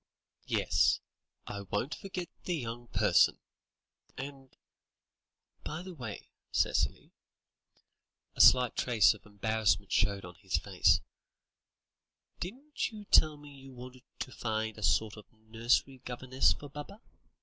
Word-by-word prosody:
"Yes; 70 -1 +2 0.5
I 100 -1 -6
won't 105 +8 -2
forget 185 -3 -6 0.2
the 180 - 0
'young 120 -4 -5
person' - - +4 0.8
and 135 0 -9 1.1
by 155 +3 -5
the 185 0 -8
way, 120 -9 -8 0.2
Cicely," - - 0 1.2
a - - +2
slight 125 -2 +7
trace 110 -6 +4
of 110 - -16
embarrassment 110 +1 0
showed 100 -1 +1
on 90 - -10
his 90 - -2
face, - - +3 1.4
"didn't 265 - -4
you 210 -2 -10
tell 155 -5 +5
me 145 0 -13
you 135 -1 -13
wanted 125 +1 -11 0.2
to 130 - -4
find 110 -2 -3
a - - -10
sort 110 -1 +1
of 105 - -14
nursery 115 +4 0
governess 130 +1 +1
for 145 - -5
Baba?" 150 +8 -9
125 Hz, 125 wpm, -31 LUFS, 110-145 Hz, 1.4 s, slight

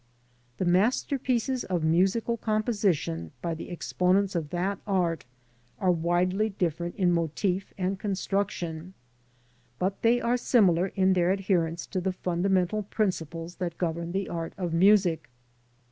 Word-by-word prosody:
The 185 - -1
masterpieces 250 - +1
of 180 -3 -2
musical 190 +8 +2
composition 205 - -1
by 170 -1 -2
the 160 - -7
exponents 185 +2 +1
of 165 -4 -2
that 185 +4 -2
art 175 -5 0 0.5
are 185 -3 +2
widely 180 +5 +1
different 175 -3 -2
in 180 -2 +2
mofi/ 175 +3 0
and 190 0 -1
construction, 190 -4 -3 0.8
but 190 +2 -2
they 235 +1 +4
are 240 +1 +1
similar 190 -8 +3
in 190 -1 +2
their 180 -1 +2
adherence 180 -4 0
to 185 - -3
the 190 +1 -1
fundamental 185 +3 0
principles 175 -5 -3
that 175 -3 -4
govern 170 -1 -2
the 195 +1 -2
art 165 -1 -4
of 175 -3 -3
music. 185 -3 +4
185 Hz, 130 wpm, -27 LUFS, 170-200 Hz, 0.8 s, they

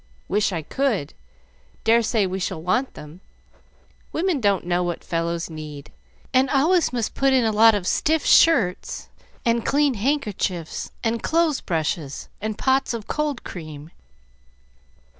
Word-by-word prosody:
"Wish 210 +1 +1
I 165 -4 -3
could. 220 - -1 0.7
Dare 230 +1 +4
say 220 -2 +1
we 190 +1 -3
shall 175 - -3
want 185 +11 -1
them. 150 +5 -11 0.9
Women 330 -4 0
don't 200 -4 +1
know 175 0 +1
what 175 -1 -3
fellows 170 0 -2
need, 150 -3 -9 0.4
and 260 0 +4
always 320 +6 +3
must 235 -3 -2
put 270 0 +2
in 255 -3 +3
a 220 - +2
lot 220 +1 +6
of 195 -3 -3
stiff 315 +9 +1
shirts 225 - +3 0.4
and 235 -1 +2
clean 285 -1 +2
handkerchiefs 205 - -2
and 230 0 0
clothes 325 -3 +1
brushes 155 -3 -3
and 215 0 -3
pots 265 -2 +1
of 220 -3 -6
cold 300 -4 -2
cream. 155 -2 -9
215 Hz, 140 wpm, -23 LUFS, 175-270 Hz, 0.9 s, lot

